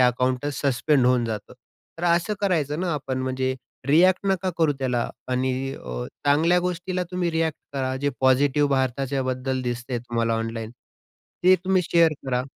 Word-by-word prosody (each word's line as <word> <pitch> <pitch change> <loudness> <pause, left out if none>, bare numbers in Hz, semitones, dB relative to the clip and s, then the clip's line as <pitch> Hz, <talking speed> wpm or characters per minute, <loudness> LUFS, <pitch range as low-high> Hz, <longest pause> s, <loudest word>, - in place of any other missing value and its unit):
अकाउंटच 125 +3 +1
suspend 140 0 +2
होऊन 125 -1 +3
जातं. 110 -3 -5 0.5
तर 175 - -3
असं 175 +4 +2
करायचं 160 -6 0
ना 180 -2 0
आपण 135 -3 -3
म्हणजे 130 0 -1 0.3
रिएक्ट 180 +7 +4
नका 190 -1 +1
करू 160 -3 +3
त्याला 125 -3 0 0.2
आणि 130 +1 +1 0.2
अ, - - -6 0.2
चांगल्या 160 +5 +4
गोष्टीला 180 +1 -2
तुम्ही 180 -1 -1
रिएक्ट 160 -1 0 0.2
करा 130 -2 -1
जे 145 - +2
पॉझिटिव्ह 140 +2 +3
भारताच्याबद्दल 130 0 -1
दिसतंय 120 0 -3
तुम्हाला 115 -1 -1
ऑनलाईन. 115 0 -3 0.7
ते 185 +1 +8
तुम्ही 185 -1 +3
शेअर 165 -2 +5
करा. 125 -1 0
135 Hz, 150 wpm, -24 LUFS, 125-165 Hz, 0.7 s, ते